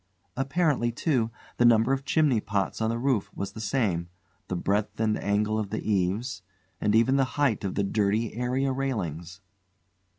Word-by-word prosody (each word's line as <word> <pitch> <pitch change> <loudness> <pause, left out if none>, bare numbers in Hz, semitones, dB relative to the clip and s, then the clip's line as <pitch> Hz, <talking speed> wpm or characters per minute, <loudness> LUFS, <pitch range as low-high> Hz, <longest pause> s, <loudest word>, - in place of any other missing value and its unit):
Apparently, 135 -3 +1
too, 120 -2 0 0.3
the - - +3
number 120 +2 +5
of 135 0 -2
chimney 145 -6 +3
pots 100 +1 -2
on 110 - +1
the 115 - -1
roof 125 -4 0
was 100 0 -4
the 110 - -8
same; 100 -7 0 0.4
the 95 - -2
breadth 100 +5 -1
and 110 -1 +2
angle 105 +2 +1
of 105 -2 -3
the 110 - -4
eaves; 100 +3 0 0.4
and 105 0 +2
even 130 +4 +4
the 135 - +4
height 140 -8 +2
of 95 - -3
the 100 - +1
dirty 105 +2 0
area 125 +3 0
railings. 95 - -3
110 Hz, 170 wpm, -27 LUFS, 100-130 Hz, 0.4 s, number